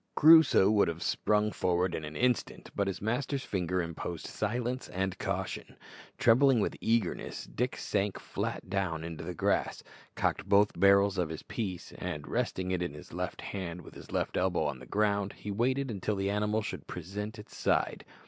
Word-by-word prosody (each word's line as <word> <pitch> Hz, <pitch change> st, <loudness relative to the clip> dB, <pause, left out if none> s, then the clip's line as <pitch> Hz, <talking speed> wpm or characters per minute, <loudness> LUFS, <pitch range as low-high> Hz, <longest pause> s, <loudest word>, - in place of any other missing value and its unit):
Crusoe 155 Hz, -10 st, +7 dB
would 105 Hz, -2 st, +4 dB
have 85 Hz, +1 st, -3 dB
sprung 105 Hz, 0 st, +1 dB
forward 90 Hz, -1 st, +1 dB
in 80 Hz, -, -3 dB
an 75 Hz, +1 st, -7 dB
instant, 125 Hz, -1 st, 0 dB
but 100 Hz, -1 st, +1 dB
his 95 Hz, 0 st, -3 dB
master's 125 Hz, +4 st, -1 dB
finger 90 Hz, -1 st, -1 dB
imposed 85 Hz, 0 st, -5 dB
silence 120 Hz, +4 st, -2 dB
and 95 Hz, 0 st, -2 dB
caution. -, -, -3 dB, 0.4 s
Trembling 130 Hz, +2 st, +5 dB
with -, -, 0 dB
eagerness, 115 Hz, -5 st, 0 dB
Dick 125 Hz, +2 st, -2 dB
sank 100 Hz, -1 st, -1 dB
flat -, -, -4 dB
down 90 Hz, -4 st, -1 dB
in 85 Hz, 0 st, -5 dB
the -, -, -5 dB
grass, -, -, 0 dB, 0.3 s
cocked 100 Hz, -, -1 dB
both 100 Hz, +1 st, +5 dB
barrels 100 Hz, -1 st, +5 dB
of 85 Hz, -3 st, 0 dB
his 80 Hz, -1 st, -6 dB
piece, 95 Hz, -6 st, -5 dB
and, -, -, -4 dB
resting 95 Hz, 0 st, -1 dB
it 90 Hz, -1 st, 0 dB
on 85 Hz, -5 st, -3 dB
his 75 Hz, -, -12 dB
left -, -, -4 dB
hand 90 Hz, -3 st, -5 dB
with -, -, -13 dB
his -, -, -12 dB
left -, -, -1 dB
elbow -, -, +1 dB
on 65 Hz, -, -2 dB
the 65 Hz, -, -12 dB
ground, 100 Hz, -1 st, +1 dB
he 105 Hz, -, -6 dB
waited 130 Hz, +5 st, 0 dB
until 105 Hz, 0 st, -2 dB
the 95 Hz, 0 st, 0 dB
animal 105 Hz, +1 st, 0 dB
should -, -, -6 dB
present 105 Hz, +6 st, -5 dB
its 105 Hz, -, -12 dB
side. -, -, +1 dB
100 Hz, 180 wpm, -31 LUFS, 90-110 Hz, 0.4 s, Crusoe